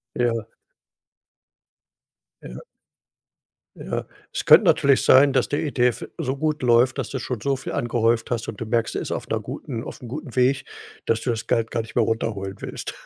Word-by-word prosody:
Ja. 115 -2 0 1.9
Ja. 60 0 -9 1.2
Ja. - - -4 0.3
Es - - -3
könnte - - +8
natürlich 140 -1 +4
sein, 135 +1 +6
dass 135 - +1
der 145 - -1
ETF 125 -5 0
so 130 +2 -2
gut 155 -1 -1
läuft, 120 +1 +4
dass - - -3
du 135 - -3
schon 125 -1 -4
so 135 +4 0
viel 135 - -6
angehäuft 115 -1 0
hast 115 -2 -2
und 105 - -6
du - - -2
merkst, 115 0 0
er - - -1
ist - - -5
auf - - -4
'ner - - -1
guten 115 -1 -6
auf'm 125 - -9
guten 140 -1 -7
Weg, 130 +2 +2 0.4
dass 115 0 +1
du 125 - -1
das 115 -1 -3
Geld 115 0 0
gar 115 - -1
nicht 115 - -12
mehr 120 - +3
runterholen 105 -4 -2
willst. - - -6
120 Hz, 185 wpm, -23 LUFS, 115-130 Hz, 1.9 s, könnte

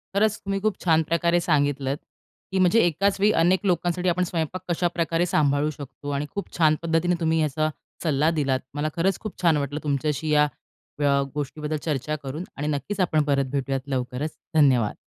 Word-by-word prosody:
खरंच, 210 +1 +3
तुम्ही 195 0 -1
खूप 215 -2 +1
छान 160 -2 +3
प्रकारे 170 +2 +2
सांगितलंत, 145 -3 +1 0.5
की 190 - 0
म्हणजे 185 +5 +5
एकाच 195 +5 +1
वेळी 205 +2 +4
अनेक 180 +3 +3
लोकांसाठी 180 0 +1
आपण 180 +1 +1
स्वयंपाक 170 +1 -2
कशाप्रकारे 170 0 0
सांभाळू 150 -3 +2
शकतो. 145 -1 -8
आणि 140 +1 -1
खूप 200 - -4
छान 155 -2 +4
पद्धतीने 170 +1 +1
तुम्ही 160 -1 +1
याचा 155 +1 0 0.3
सल्ला 155 -1 +2
दिलात. 140 -5 0
मला 145 +1 -1
खरंच 180 +2 +1
खूप 215 - -8
छान 165 -4 +4
वाटलं, 145 +1 -2
तुमच्याशी 150 +2 -1
या 150 0 +5 0.5
अ, 145 - +1 0.3
गोष्टीबद्दल 150 +1 -3
चर्चा 150 0 -2
करून 140 +6 -5
आणि 145 +1 -2
नक्कीच 150 +7 -3
आपण 155 -4 +2
परत 140 -2 +1
भेटूयात 135 -1 -1
लवकरच. 130 +3 -2 0.2
धन्यवाद. 130 -8 +4
155 Hz, 170 wpm, -25 LUFS, 145-175 Hz, 0.5 s, म्हणजे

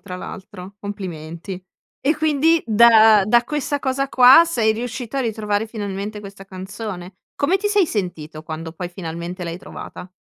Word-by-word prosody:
tra 185 -3 -8
l'altro, 185 +1 -9
complimenti. 185 -2 -7 0.4
E, 295 +3 +1
quindi 315 +1 +2
da 220 -2 +6
da 235 +2 +4
questa 290 +1 -2
cosa 275 0 -1
qua 255 +6 +8
sei 235 -10 +1
riuscito 240 +2 -5
a - - +1
ritrovare 215 -3 -1
finalmente 210 -1 -5
questa 200 -1 -11
canzone. 190 -1 -8 0.2
Come 320 +7 +1
ti 400 +2 -3
sei 410 -3 +3
sentito 160 - -4
quando, 160 +1 -7
poi, 175 +2 -6
finalmente 175 0 -7
l'hai 170 0 -5
trovata? 180 -1 -10
205 Hz, 150 wpm, -21 LUFS, 185-245 Hz, 0.4 s, qua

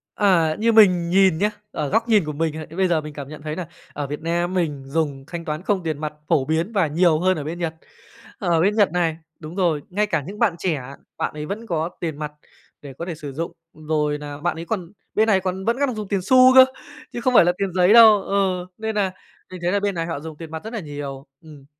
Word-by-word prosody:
Ờ, 170 -6 +3
như 230 +1 +2
mình 180 -6 +5
nhìn 190 -3 +4
nhá, 205 +3 +2 0.2
ở 150 - -2
góc 225 - +1
nhìn 210 -5 +4
của 150 - -4
mình 160 +1 -1
hay 155 0 -6
bây 185 +3 0
giờ 170 -3 +2
mình 150 -1 -9
cảm 140 -2 -7
nhận 155 0 -10
thấy 155 0 -4
nà 180 - -4 0.3
ở 145 -1 -4
Việt 145 +2 -5
Nam 175 +2 -1
mình 150 -7 -1
dùng 140 -2 -2
thanh 170 0 -6
toán 155 0 -4
không 190 -1 0
tiền 160 -3 -3
mặt 155 -1 -3 0.2
phổ 135 - +3
biến 165 +8 -1
và 195 -6 +2
nhiều 160 +1 +3
hơn 185 +1 +2
ở 150 - -4
bên 165 +3 -5
Nhật. 165 -2 -2 0.7
Ở 170 -6 +1
bên 200 +4 +2
Nhật 205 -3 +3
này, 165 -2 0 0.2
đúng 155 +1 -9
rồi, 170 -6 +1
ngay 205 +3 +1
cả 160 -7 0
những 205 +2 -8
bạn 215 -8 +2
trẻ, 165 -6 -1 0.4
bạn - - -2
ấy 150 0 -6
vẫn 210 +8 -5
có 165 -2 -1
tiền 160 -4 -4
mặt 150 -1 -4 0.5
để 140 -2 -10
có 165 +6 -6
thể 175 -2 -5
sử 145 -3 -8
dụng. 165 +4 -4 0.2
Rồi 150 -1 -1
nà 145 -1 -7
bạn 170 +3 -1
ấy 165 +1 -7
còn 180 -4 -4 0.2
bên 220 +1 +3
này 200 -4 +4
còn 190 0 -4
vẫn 235 +2 +1
đang 285 - +2
còn 250 - -3
dùng 210 -2 -5
tiền 195 -1 -1
xu 255 +6 +6
cơ, 260 0 +10 0.5
chứ 240 - -4
không 255 +1 +1
phải 215 - +7
là 175 - +4
tiền 195 -3 -2
giấy 180 +2 +4
đâu, 220 -3 +8
ừ, 190 -3 0
nên 220 0 -3
nà 195 -3 +1 0.4
mình 185 - -7
thấy 175 +1 0
là 205 - +2
bên 200 -1 -1
này 165 -1 -2
họ 165 -4 -4
dùng 155 0 -9
tiền 165 -1 -9
mặt 160 0 -6
rất 220 +2 -7
là 230 - -3
nhiều, 145 -4 -7 0.2
ừm. 150 -4 -14
170 Hz, 265 wpm, -22 LUFS, 155-195 Hz, 0.7 s, cơ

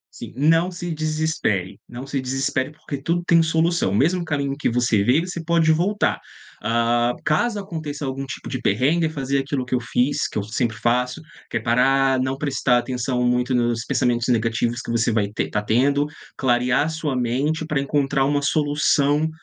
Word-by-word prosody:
Sim, - - -9
não 165 +6 +3
se 175 0 -6
desespere, 155 - -1
não 125 +3 -8
se 135 -1 -2
desespere, 130 +1 -1
porque 150 -2 -7
tudo 170 +5 -1
tem 165 -1 +4
solução. 165 - +1
O 100 - 0
mesmo 170 - +2
caminho 140 -3 -1
que - - -1
você 120 -3 +2
veio, 145 - +2
você 170 -2 -5
pode 165 -1 +3
voltar, 190 +6 +1 0.4
hã. 120 +1 +1
Caso 210 +8 +1
aconteça 155 -7 -5
algum 135 +1 -4
tipo 130 - -7
de 130 - -3
perrengue, 145 +11 +2
fazer 140 -3 -2
aquilo 135 -1 -2
que 125 - -1
eu - - +1
fiz, 125 +3 0
que - - -6
eu 100 - -3
sempre 115 +1 -2
faço, 125 +6 0 0.3
que - - -2
é - - -1
parar, 135 +2 +2
não 130 +1 -1
prestar 135 -4 +1
atenção 125 0 -2
muito 125 +1 +1
nos 120 -1 0
pensamentos 120 -2 0
negativos 115 0 0
que - - -9
você 115 0 +1
vai 105 -2 +1
ter - - -1
está 105 - -2
tendo, 140 +7 +2 0.3
clarear 125 +3 +1
sua 155 -4 -3
mente 130 +6 0
pra 150 -3 0
encontrar 140 -1 +1
uma 145 +1 +1
solução 145 +1 +2
135 Hz, 180 wpm, -22 LUFS, 120-155 Hz, 0.4 s, tem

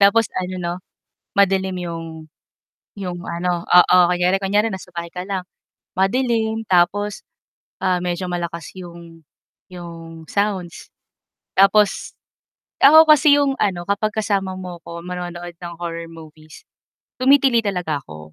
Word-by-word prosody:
Tapos 205 +2 +4
ano 185 0 -5
'no, 175 -1 -3 0.6
madilim 190 -1 +2
'yong 165 -2 -5 0.9
'yong 180 -3 -5
ano 175 0 -2
oo. 180 +1 +6
Kunyari 180 +2 +1
kunyari 205 +3 +1
nasa 185 -2 -8
bahay 170 0 -5
ka 180 +1 -6
lang, 195 -2 -3 0.5
madilim 225 +1 0
tapos, 190 +3 +1 0.6
ah, 185 -1 +2
medyo 180 +1 -2
malakas 170 -1 -4
'yong 170 -2 -11 0.5
'yong 165 -2 -10
sounds, 195 -4 -2 0.7
tapos 195 +1 +3 0.7
ako 315 +3 +8
kasi 290 0 +5
'yong 280 -1 +2
ano, 180 -4 0
kapag 205 +2 +1
kasama 200 -3 -1
mo 180 -2 -7
ako 170 0 -9
manonood 175 -1 -6
ng 170 -1 -8
horror 170 -1 -5
movies, 155 -1 -14 0.6
tumitili 265 -3 +4
talaga 180 -7 -2
ako. 75 0 -11
180 Hz, 125 wpm, -20 LUFS, 170-205 Hz, 0.9 s, ako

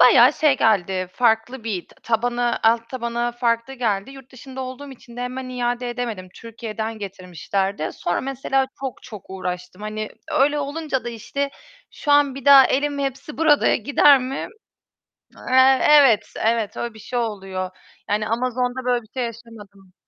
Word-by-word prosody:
Bayağı - - +7
şey 300 -4 +3
geldi, 190 -5 +1
farklı 230 +1 +1
bir 195 -6 -3 0.2
tabanı, 240 +1 0
alt 230 +1 +3
tabanı 240 -1 -2
farklı 235 +2 0
geldi. 220 -2 -1
Yurt 270 -1 -14
dışında 265 +1 -9
olduğum 260 +2 -7
için 240 -2 -14
de 245 - -5
hemen 255 +1 -4
iade 245 -1 -2
edemedim, 230 -7 -5
Türkiye'den 225 -1 -6
getirmişlerdi. 190 -2 -3
Sonra 175 - -2
mesela 270 0 -1
çok 265 -3 -5
çok 210 -4 -11
uğraştım. 180 0 -6
Hani, 215 0 -4 0.2
öyle 290 +2 +3
olunca 290 -2 -3
da, - - -3
işte, 280 +5 -4 0.4
şu 290 - -4
an 285 -2 +4
bir 275 - -9
daha 275 -2 +9
elim 285 +1 0
Hepsiburada'ya 290 +3 +1
gider 280 +3 +5
mi? 260 +2 -4 1.0
Eee, 260 +1 +5
evet 275 -8 +5
evet, 225 -2 0
öyle 235 -1 -4
bir 220 - -14
şey 245 +3 -3
oluyor; 195 -5 -3 0.4
yani 210 +1 0
Amazon'da 250 +2 -1
böyle 245 -1 +1
bir 220 - -21
şey 255 - -2
yaşamadım. 215 -5 -10
240 Hz, 150 wpm, -22 LUFS, 215-265 Hz, 1.0 s, daha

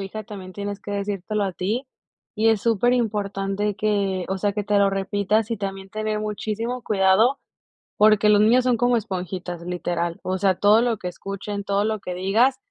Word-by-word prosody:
hija 195 +2 -6
también 195 -4 -9
tienes 205 0 -5
que 205 - -8
decírtelo 200 +1 -2
a 190 - -2
ti, 220 +10 -2 0.5
y 225 +1 +2
es 220 -3 +2
superimportante 210 -3 0
que, 200 -3 0
o 190 0 -2
sea, 205 +1 0
que 205 0 -3
te 205 0 +2
lo 200 0 +4
repitas 200 +3 0
y 230 - -1
también 195 -1 -5
tener 215 -1 -2
muchísimo 220 +3 -3
cuidado, 210 +6 +3 0.6
porque 215 0 +5
los 210 -1 +5
niños 245 +4 +4
son 250 -2 +3
como 245 +1 +2
esponjitas, 180 -4 -5
literal, 175 -1 -3
o 185 0 -1
sea, 190 -1 +3
todo 210 +3 +5
lo 235 -4 0
que 180 - -4
escuchen, 200 +2 -6
todo 200 +1 +1
lo 215 -1 -1
que 180 - -6
digas, 215 +9 +2
205 Hz, 185 wpm, -23 LUFS, 195-215 Hz, 0.6 s, porque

